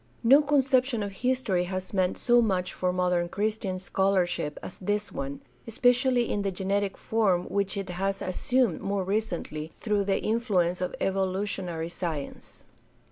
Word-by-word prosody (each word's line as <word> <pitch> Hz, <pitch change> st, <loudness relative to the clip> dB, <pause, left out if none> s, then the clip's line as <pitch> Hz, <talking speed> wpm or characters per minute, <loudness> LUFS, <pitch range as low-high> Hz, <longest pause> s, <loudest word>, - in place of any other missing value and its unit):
No 270 Hz, +6 st, +7 dB
conception 265 Hz, -5 st, +2 dB
of 200 Hz, -, -4 dB
history 210 Hz, -4 st, 0 dB
has 185 Hz, +1 st, -5 dB
meant 185 Hz, -2 st, +1 dB
so 240 Hz, -1 st, +4 dB
much 185 Hz, -5 st, 0 dB
for 180 Hz, 0 st, 0 dB
modern 180 Hz, -1 st, +1 dB
Christian 210 Hz, -1 st, -2 dB
scholarship 185 Hz, -5 st, 0 dB
as -, -, -8 dB
this 205 Hz, +2 st, -1 dB
one, 140 Hz, +1 st, -5 dB, 0.3 s
especially 245 Hz, +1 st, +3 dB
in 205 Hz, -, 0 dB
the 200 Hz, -, 0 dB
genetic 195 Hz, +1 st, -1 dB
form 200 Hz, -6 st, +1 dB
which 200 Hz, 0 st, -1 dB
it 195 Hz, -1 st, -3 dB
has 195 Hz, +2 st, -2 dB
assumed 235 Hz, +2 st, 0 dB
more 200 Hz, -1 st, -1 dB
recently 180 Hz, -6 st, -3 dB
through 205 Hz, -2 st, 0 dB
the 195 Hz, -1 st, +1 dB
influ 215 Hz, -5 st, +1 dB
ence 180 Hz, +1 st, -4 dB
of 180 Hz, -, -2 dB
evolutionary 190 Hz, -3 st, -1 dB
science. 165 Hz, -5 st, -6 dB
195 Hz, 150 wpm, -27 LUFS, 180-220 Hz, 0.3 s, No